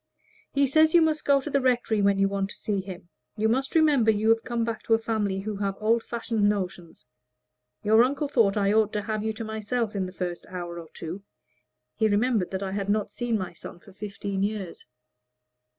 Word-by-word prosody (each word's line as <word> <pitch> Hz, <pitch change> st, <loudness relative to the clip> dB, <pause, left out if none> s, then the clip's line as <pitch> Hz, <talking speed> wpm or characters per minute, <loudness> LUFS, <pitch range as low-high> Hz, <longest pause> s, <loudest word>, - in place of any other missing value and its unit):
"He 280 Hz, 0 st, +3 dB
says 315 Hz, +4 st, +4 dB
you 340 Hz, -, +8 dB
must 310 Hz, -1 st, 0 dB
go 280 Hz, -1 st, +5 dB
to 300 Hz, -, -5 dB
the 280 Hz, -1 st, +2 dB
rectory 245 Hz, -4 st, +1 dB
when 200 Hz, 0 st, +3 dB
you 195 Hz, 0 st, +3 dB
want 195 Hz, 0 st, -2 dB
to -, -, -10 dB
see 200 Hz, -2 st, -2 dB
him. 185 Hz, -2 st, -10 dB, 0.3 s
You 215 Hz, +1 st, +2 dB
must 265 Hz, +6 st, 0 dB
remember 295 Hz, -8 st, +4 dB
you 220 Hz, 0 st, +2 dB
have 225 Hz, 0 st, +3 dB
come 235 Hz, -1 st, -1 dB
back 230 Hz, -1 st, -3 dB
to 225 Hz, -, +4 dB
a -, -, +2 dB
family 210 Hz, -4 st, -2 dB
with 210 Hz, -1 st, -4 dB, 0.2 s
old 225 Hz, +2 st, +2 dB
fashioned 225 Hz, -3 st, 0 dB
notions. 185 Hz, -4 st, -4 dB, 0.8 s
Your 220 Hz, +2 st, +6 dB
uncle 280 Hz, +3 st, 0 dB
thought 225 Hz, -7 st, +2 dB
I 200 Hz, 0 st, +2 dB
ought 215 Hz, -1 st, +3 dB
to 210 Hz, -1 st, -2 dB
have 215 Hz, 0 st, -2 dB
you 220 Hz, -, 0 dB
to 225 Hz, -, -6 dB
myself 220 Hz, +1 st, -2 dB
in 190 Hz, -2 st, -1 dB
the -, -, -8 dB
first 180 Hz, -2 st, -5 dB
hour 175 Hz, -2 st, -6 dB
or 165 Hz, -, -10 dB
two. 170 Hz, +4 st, -6 dB, 0.7 s
He 220 Hz, -, +2 dB
remembered 215 Hz, -2 st, +1 dB
that 190 Hz, +1 st, -3 dB
I 190 Hz, -, -3 dB
had 200 Hz, 0 st, -3 dB
not 210 Hz, 0 st, 0 dB
seen 240 Hz, -2 st, -1 dB
my 185 Hz, -3 st, -5 dB
son 175 Hz, -, -10 dB
for 200 Hz, -, -17 dB
fifteen 200 Hz, -1 st, -4 dB
years." 200 Hz, -4 st, -4 dB
215 Hz, 215 wpm, -26 LUFS, 195-235 Hz, 0.8 s, you